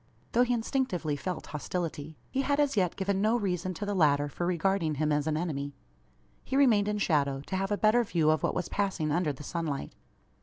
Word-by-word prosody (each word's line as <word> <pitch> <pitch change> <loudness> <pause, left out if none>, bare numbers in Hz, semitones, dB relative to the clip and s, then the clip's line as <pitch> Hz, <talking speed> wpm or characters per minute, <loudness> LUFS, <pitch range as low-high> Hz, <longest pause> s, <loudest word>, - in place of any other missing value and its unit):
Though 240 - +3
he 245 0 +3
instinctively 225 - -1
felt 180 +5 -4
hostility, 155 -1 -4
he 270 - +1
had 285 +1 +1
as 285 -3 +2
yet 180 -4 +1
given 195 0 0
no 220 +3 +3
reason 185 -4 -2
to 205 - -4
the 205 - -1
latter 145 -5 +3
for 175 +4 -3
regarding 175 -2 +1
him 155 +1 0
as 150 0 +1
an 155 -1 +1
enemy. 145 -4 -3 0.7
He 270 - -1
remained 225 -7 +4
in 210 0 0
shadow, 140 -8 +1
to 165 - -5
have 195 +1 -1
a 205 - +1
better 220 +3 +4
view 165 -7 +2
of 155 - +1
what - - 0
was 180 - -1
passing 190 -7 -1
under 165 0 +1
the 145 +1 -9
sunlight. 160 -4 -3
180 Hz, 215 wpm, -29 LUFS, 155-205 Hz, 0.7 s, remained